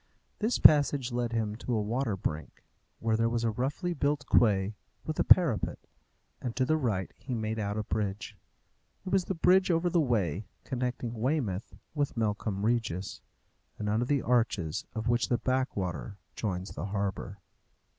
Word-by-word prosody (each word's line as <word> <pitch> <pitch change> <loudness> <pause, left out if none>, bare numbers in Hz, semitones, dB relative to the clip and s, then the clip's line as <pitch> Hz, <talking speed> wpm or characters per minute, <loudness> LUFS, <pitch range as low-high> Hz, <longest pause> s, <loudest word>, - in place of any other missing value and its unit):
This 220 +3 +1
passage 145 -4 +5
led 120 -1 -1
him 110 -2 -1
to 120 0 -2
a - - +1
water 110 0 -1
brink, 80 -3 -4 0.3
where 115 -1 0
there 115 +1 +2
was 120 0 -1
a 115 - +2
roughly 140 - -2
built 145 -2 0
quay 100 -5 +3 0.3
with 155 - -3
a - - +4
parapet, 160 - +4 0.6
and 120 -3 -4
to 130 - +2
the 155 - +2
right 110 - -1
he 130 -2 -5
made 110 0 -2
out 105 0 -2
a 110 - -1
bridge. 105 -2 -3 0.7
It - - -4
was 190 -2 +2
the 190 - -2
bridge 185 +3 +4
over 170 +1 +2
the 170 - +3
Wey, 105 - 0 0.2
connecting 125 -2 -3
Weymouth 115 -4 -1 0.2
with 145 -5 -1
Melcombe 105 -2 -1
Regis, 115 -6 -1 0.6
and 105 - -4
under 110 +4 +1
the 140 0 +1
arches 110 -10 +1
of 110 +1 -3
which 120 +1 +2
the 120 - +3
Backwater 100 - -2 0.2
joins 95 -3 -3
the - - -5
harbour. 100 -1 -3
115 Hz, 165 wpm, -30 LUFS, 105-135 Hz, 0.7 s, passage